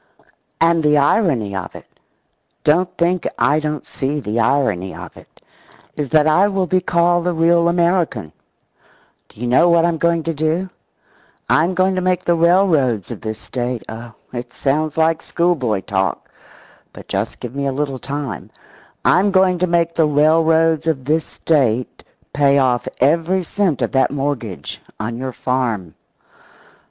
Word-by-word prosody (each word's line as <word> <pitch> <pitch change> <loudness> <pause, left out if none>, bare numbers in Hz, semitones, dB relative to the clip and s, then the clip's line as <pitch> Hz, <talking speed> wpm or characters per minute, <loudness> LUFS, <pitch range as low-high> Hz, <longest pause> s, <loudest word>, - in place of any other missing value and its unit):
And 165 0 +3
the 150 -1 +3
irony 140 - +1
of 95 -2 -6
it - - -11 0.8
don't 175 +5 +2
think 175 +1 0
I 150 +2 +2
don't 150 -1 -4
see 140 +3 -3
the 115 -3 -3
irony 115 -7 0
of - - -10
it - - -19 0.5
is 145 -3 -3
that 155 +1 +4
I 175 +6 +4
will 195 -2 -1
be 185 +1 +1
called 175 0 +1
the 180 - 0
real 170 +1 +3
American. 170 - 0 1.0
Do - - -19
you 120 - -4
know 130 +8 +4
what 170 -1 +4
I'm 170 -2 -1
going 170 0 +1
to 165 - -2
do? 160 +5 -1 0.8
I'm 170 +4 +2
going 185 +1 +2
to 185 - -1
make 185 0 0
the 175 - +3
railroads 165 - +2
of - - -7
this 110 -1 -5
State 125 -2 -4
oh, 115 0 -9 0.2
it 120 0 -6
sounds 150 +4 -1
like 160 0 +2
schoolboy 140 - 0
talk, 95 0 -2 0.6
but - - -13
just - - -3
give 120 -1 -7
me 140 0 -2
a - - 0
little 135 -1 -3
time 140 - -5 0.6
I'm 190 +4 +4
going 185 -2 +2
to 180 - +1
make 170 -1 +1
the 160 -2 +2
railroads 160 +2 +3
of 135 -5 -1
this 155 +2 +1
State 130 -6 -1 0.3
pay 140 -1 +3
off 125 -3 +1
every 165 +7 +2
cent 180 -4 -1
of - - -1
that 135 - +2
mortgage 135 - -4 0.2
on 115 +2 -4
your 130 0 -4
farm! 120 - -2
155 Hz, 160 wpm, -18 LUFS, 130-170 Hz, 1.0 s, that